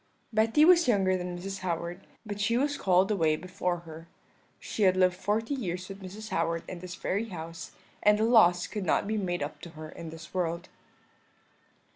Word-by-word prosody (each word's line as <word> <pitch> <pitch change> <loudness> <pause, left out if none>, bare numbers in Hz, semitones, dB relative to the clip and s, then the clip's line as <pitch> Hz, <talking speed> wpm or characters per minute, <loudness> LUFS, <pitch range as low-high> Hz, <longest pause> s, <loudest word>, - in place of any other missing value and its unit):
"Betty 225 +8 +4
was 345 -3 +6
younger 195 -5 +3
than 180 -1 -4
Mrs. 195 +2 -5
Howard, 175 0 -4 0.2
but 205 -1 -5
she 230 +4 +2
was 285 +3 +1
called 190 -3 +3
away 160 -6 +2
before 180 0 -3
her; 165 0 -11 0.5
she - - -5
had 185 -2 +5
lived 185 -1 +4
forty 215 +7 -1
years 185 -8 -3
with 195 0 -8
Mrs. 205 +3 -8
Howard 165 0 0
in 180 - -6
this 180 0 -7
very 200 +4 -1
house, 165 -1 -7 0.3
and 210 0 +5
the 215 - +1
loss 210 -7 +5
could 210 - -4
not 175 - +2
be 215 +2 -1
made 175 -6 -1
up 145 - -6
to 170 - -8
her 155 0 -7
in 165 0 -8
this 165 +1 -11
world. 170 -1 -2
185 Hz, 190 wpm, -29 LUFS, 170-210 Hz, 0.5 s, was